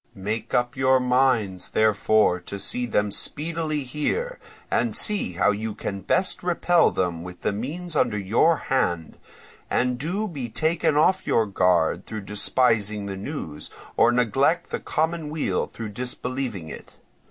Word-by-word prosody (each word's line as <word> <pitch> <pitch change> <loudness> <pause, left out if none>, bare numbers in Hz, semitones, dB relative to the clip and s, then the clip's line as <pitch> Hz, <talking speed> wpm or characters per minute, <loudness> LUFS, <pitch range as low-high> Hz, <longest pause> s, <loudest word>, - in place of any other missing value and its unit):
Make 105 +3 -3
up 120 +2 +1
your 130 0 +4
minds, 125 -7 +1
therefore, 110 -3 +3
to 95 +3 -7
see 125 +5 -3
them 105 -2 +1
speedily 155 +3 -2
here, 450 - -2 0.3
and - - +1
see 205 - +2
how 90 +4 +3
you 105 +1 -3
can 100 -1 -5
best 185 - 0
repel 175 0 +3
them 90 -3 -2
with 90 +1 -9
the - - 0
means 155 - -4
under 120 -7 +2
your 115 - +3 0.2
hand, 85 -10 0 0.5
and 125 0 +1
do 185 +9 -2
be 140 - -5
taken 155 +4 +1
off 185 +5 +3
your 115 - +3
guard 90 -3 +1
through 110 -1 -5
despising 105 0 +1
the 100 -1 -4
news, 95 - -6 0.3
or 120 - +5
neglect 135 +8 +1
the - - -2
common 160 0 -1
weal 155 0 -1
through 110 -2 -7
disbelieving 125 -3 -4
it. - - -11
120 Hz, 150 wpm, -24 LUFS, 100-150 Hz, 0.5 s, or